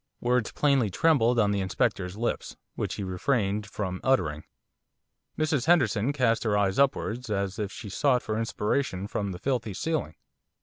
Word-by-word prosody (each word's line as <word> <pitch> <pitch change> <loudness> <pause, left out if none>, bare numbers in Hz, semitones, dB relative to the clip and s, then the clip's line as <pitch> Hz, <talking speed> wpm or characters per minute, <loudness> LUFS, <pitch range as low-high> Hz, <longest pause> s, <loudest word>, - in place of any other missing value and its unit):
Words 125 -2 +1
plainly 140 -7 +2
trembled 125 - +3
on 105 -3 +3
the 100 - 0
Inspector's 95 0 -1
lips, 120 +2 -3 0.2
which - - -3
he 100 - -4
refrained 100 +2 0
from 95 -3 -4
uttering. 80 - +1 0.9
Mrs 155 -3 0
Henderson 130 - +3
cast 125 -6 +1
her 105 -3 +1
eyes 100 +1 +1
upwards, 125 -3 +1
as 100 0 -2
if 105 -2 -2
she 110 - -8
sought 125 +5 +1
for 110 - -2
inspiration 110 -2 -1
from 100 -1 -3
the 90 - -6
filthy 115 -2 -2
ceiling. 155 - -2
110 Hz, 160 wpm, -27 LUFS, 100-130 Hz, 0.9 s, trembled